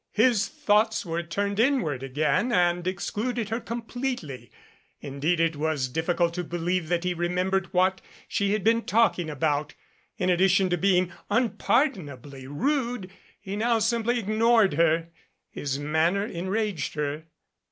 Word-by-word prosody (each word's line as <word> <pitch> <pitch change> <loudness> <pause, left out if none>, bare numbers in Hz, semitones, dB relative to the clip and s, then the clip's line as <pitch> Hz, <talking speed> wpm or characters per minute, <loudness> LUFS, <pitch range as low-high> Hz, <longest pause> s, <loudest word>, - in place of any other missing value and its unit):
His 225 -1 +3
thoughts 220 -7 +1
were 170 0 -2
turned 200 +5 -2
inward 225 - +1
again 150 - 0
and 175 -2 +2
excluded 215 +5 -2
her 225 +1 -1
completely. 235 - -5 0.5
Indeed 145 +5 -1
it 165 -1 +2
was 150 -3 -1
diffi 160 +6 -1
cult 170 -1 +2
to 180 0 -3
believe 175 0 -2
that 175 0 0
he 180 0 0
remembered 180 +2 -1
what 190 0 +2 0.3
she 200 0 0
had 215 -3 -1
been 230 +2 +3
talking 205 -7 +2
about. 150 0 -1 0.4
In 180 - -1
addition 185 +1 +3
to - - +3
being 185 -1 +2 0.2
unpardonably 145 - 0
rude, 235 - -1 0.3
he 195 0 -6
now 230 +2 +2
simply 230 +2 +1
ignored 220 -1 +3
her. 165 +1 +2 0.4
His 140 -1 -3
manner 160 +7 +1
enraged 190 -4 -2
her. 150 +1 -3
185 Hz, 140 wpm, -26 LUFS, 160-220 Hz, 0.5 s, His